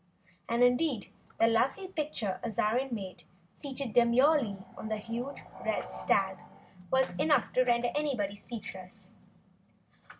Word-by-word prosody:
And 235 +1 +3
indeed, 245 -1 +2 0.3
the - - +6
lovely 255 - +1
picture 295 - -2
Azarine 235 +4 0
made, 190 -5 -5 0.3
seated 275 -4 -4
demurely 240 -1 +4 0.2
on - - -7
the 220 0 -1
huge, 235 +6 -5 0.2
red 60 +1 -2
stag, 190 - +2 0.5
was 265 0 +2
enough 295 -5 +2
to 255 - +4
render 240 -1 +2
anyone 260 -10 0
speechless. 200 -3 -7
235 Hz, 120 wpm, -31 LUFS, 205-270 Hz, 0.5 s, the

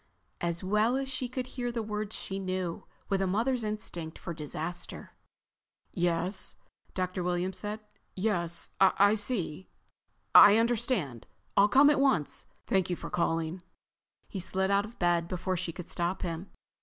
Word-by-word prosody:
As 170 0 -2
well 210 +6 +2
as 270 - 0
if 265 - -6
she 255 -1 -2
could 255 0 -3
hear 245 -1 -4
the 235 -1 -2
words 210 0 -4
she 195 0 -5
knew, 185 -2 -3 0.2
with 195 -1 +1
a 190 - +1
mother's 235 +6 +1
instinct 210 -7 -4
for 170 - -6
disaster. 160 +3 -5 0.8
"Yes," 175 +2 0 0.4
Dr. 185 0 -2
Williams 180 +1 -1
said. 210 +3 -4 0.3
"Yes... 175 -4 0
I 200 +2 +5
see... 200 -6 -1 0.7
I 205 +1 +10
understand... 225 - 0 0.3
I'll 200 - +6
come 280 +5 +7
at 290 - +2
once.... 265 - +1 0.2
Thank 190 -2 +1
you 175 - 0
for - - -8
calling." 165 +1 -1 0.7
He 195 - -5
slid 190 +1 0
out 200 +1 +3
of 225 +3 -13
bed 175 -1 +2
before 185 +1 -2
she 170 -1 -3
could 180 -1 -9
stop 175 +2 -2
him. 170 +2 -4
190 Hz, 155 wpm, -30 LUFS, 175-215 Hz, 0.8 s, I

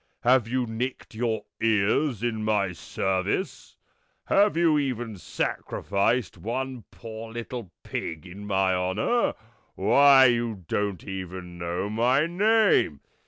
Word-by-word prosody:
Have 125 -2 +4
you 125 +1 0
nicked 120 +3 -4
your 110 -2 -2 0.2
ears 115 +3 +1
in 110 -2 -1
my 105 -3 +1
service? 95 - -2 0.5
Have 200 -3 +3
you 165 -3 +4
even 120 -5 -3
sacrificed 100 +2 -1
one 125 +4 -4
poor 110 -1 -9
little 115 -3 -6
pig 80 +1 -5
in 100 +3 -9
my 95 -1 +2
honour? 95 - 0 0.4
Why, 135 +7 +6
you 115 -6 0
don't 100 -2 -2
even 90 -2 -7
know 85 +3 -2
my 120 +7 +2
name!" 200 - +3
110 Hz, 115 wpm, -26 LUFS, 95-130 Hz, 0.5 s, Why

